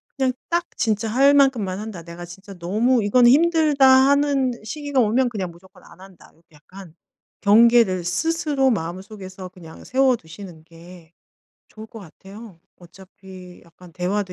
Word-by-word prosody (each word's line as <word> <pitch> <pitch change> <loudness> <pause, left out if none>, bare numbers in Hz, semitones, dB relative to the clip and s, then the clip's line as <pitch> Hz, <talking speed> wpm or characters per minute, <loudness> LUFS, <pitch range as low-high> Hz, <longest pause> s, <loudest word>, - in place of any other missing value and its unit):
그냥 265 -2 -1 0.2
딱 345 +1 -1
진짜 220 -1 -1
할 275 +5 +3
만큼만 240 -10 +1
한다. 210 -5 -8
'내가 170 +1 -10
진짜 190 +3 -13
너무 215 +7 0
이거는 240 +4 +4
힘들다.' 310 -2 +3
하는 270 0 +3
시기가 285 +4 -3
오면 245 +2 +1
그냥 190 -6 -5
무조건 180 +2 -20
안 170 +2 -18
한다. 190 -2 -17
요렇게 165 -1 -28
약간 170 +2 -15 0.5
경계를 215 -3 +4
스스로 285 - -1
마음속에서 190 +1 -7
그냥 170 -3 -15
세워두시는 200 -10 -2
게 170 0 -17 0.6
좋을 220 0 -12
것 225 - -13
같아요. 195 +1 -14 0.2
어차피 185 0 -15
약간 170 0 -18
대화도 185 +1 -3
200 Hz, 320 characters per minute, -21 LUFS, 180-255 Hz, 0.6 s, 이거는